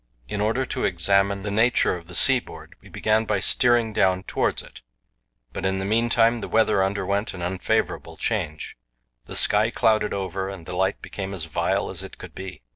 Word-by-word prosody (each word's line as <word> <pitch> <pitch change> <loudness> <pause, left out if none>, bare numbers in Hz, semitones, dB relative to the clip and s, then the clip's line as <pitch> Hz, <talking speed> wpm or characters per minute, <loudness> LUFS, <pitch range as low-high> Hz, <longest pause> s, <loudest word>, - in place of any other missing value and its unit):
In 100 +9 -3
order 115 +5 0
to - - -4
examine 100 0 +2
the 100 - -3
nature 115 -1 +2
of 85 -1 -10
the 90 - -9
seaboard, 85 - +2
we - - -16
began 110 +1 +1
by 105 -2 0
steering 120 +1 +3
down 95 -2 +2
towards - - -1
it; - - -14 0.7
but - - -5
in 95 0 0
the 95 - -3
meantime 115 +2 +2
the - - -5
weather 110 -3 +2
underwent 100 +1 -2
an 90 - -6
unfavourable 90 +1 -2
change. 75 -1 -3 0.5
The - - -6
sky 105 +2 +4
clouded 110 -2 +1
over 95 0 -3
and 95 -4 -9
the 90 - -6
light 95 +1 -1
became 95 -1 -6
as 85 -4 0
vile 80 - -1
as - - -5
it - - -10
could - - -11
be. 95 -7 -9
100 Hz, 190 wpm, -24 LUFS, 95-110 Hz, 0.7 s, sky